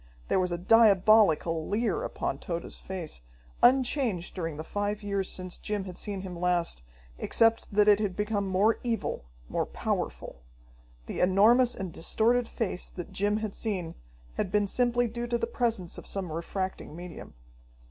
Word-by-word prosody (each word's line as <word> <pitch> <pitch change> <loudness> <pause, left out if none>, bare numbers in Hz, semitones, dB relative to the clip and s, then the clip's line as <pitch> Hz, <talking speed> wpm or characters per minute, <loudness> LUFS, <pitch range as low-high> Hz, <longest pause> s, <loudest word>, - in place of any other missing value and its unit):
There - - +3
was 180 -1 0
a 175 - -1
diabolical 195 -5 +5
leer 210 -2 0
upon 135 - -3
Tode's 170 0 -5
face, 180 - -6 0.4
unchanged 250 - +3
during 165 -5 -4
the 155 - -5
five 205 +4 -3
years 200 -2 -2
since 185 -1 -5
Jim 210 -2 -2
had 185 -2 -8
seen 200 -3 -3
him 185 -2 -7
last, 175 - 0 0.4
except 225 0 +2
that 210 0 +4
it 205 -1 +6
had 200 -4 -1
become 210 -1 -1
more 195 +4 +2
evil, 230 - -2 0.2
more - - -1
powerful. - - -3 0.6
The - - -5
enormous 225 +7 +5
and 185 -4 -5
distorted 230 +7 +2
face 205 -7 -3
that 175 - -8
Jim 205 +1 +1
had 215 -2 -3
seen 185 -7 -3 0.4
had 185 - -1
been 205 0 +3
simply 245 +3 +2
due 235 +1 -4
to 235 0 +1
the 230 - -1
presence 230 -7 -2
of - - -12
some 190 -4 -4
refracting 180 +1 -4
medium. 175 - -9
200 Hz, 160 wpm, -28 LUFS, 180-225 Hz, 0.6 s, it